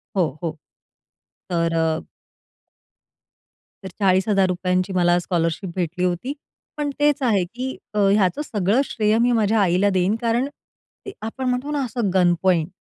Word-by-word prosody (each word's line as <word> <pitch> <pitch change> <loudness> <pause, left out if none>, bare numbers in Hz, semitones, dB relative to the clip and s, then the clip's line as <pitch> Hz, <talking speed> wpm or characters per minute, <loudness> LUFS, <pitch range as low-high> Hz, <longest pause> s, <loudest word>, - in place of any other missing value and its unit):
हो, 160 -6 0
हो. 165 - -1 1.0
तर 170 -1 0
अ 160 -1 0 1.8
तर 190 - -5
₹40,000 185 -1 +1
मला 175 -1 +3
स्कॉलरशिप 175 +1 -1
भेटली 180 0 -1
होती. 180 +10 -2 0.4
पण 295 -1 -1
तेच 295 -1 +2
आहे, 215 -7 +2
की 250 +8 -5 0.2
अ, 210 - 0
ह्याचं 195 +4 +2
सगळं 210 -1 +1
श्रेय 215 0 +1
मी 240 +2 +3
माझ्या 220 -2 +2
आईला 185 +2 +3
देईन, 185 +3 +2
कारण 235 +3 +1 0.6
ते 400 - -6
आपण 225 +4 -5
म्हणतो 250 +4 -2
ना 290 -2 0
असं 235 -4 -2
गनपॉइंट 175 -2 +2
195 Hz, 135 wpm, -22 LUFS, 180-230 Hz, 1.8 s, मला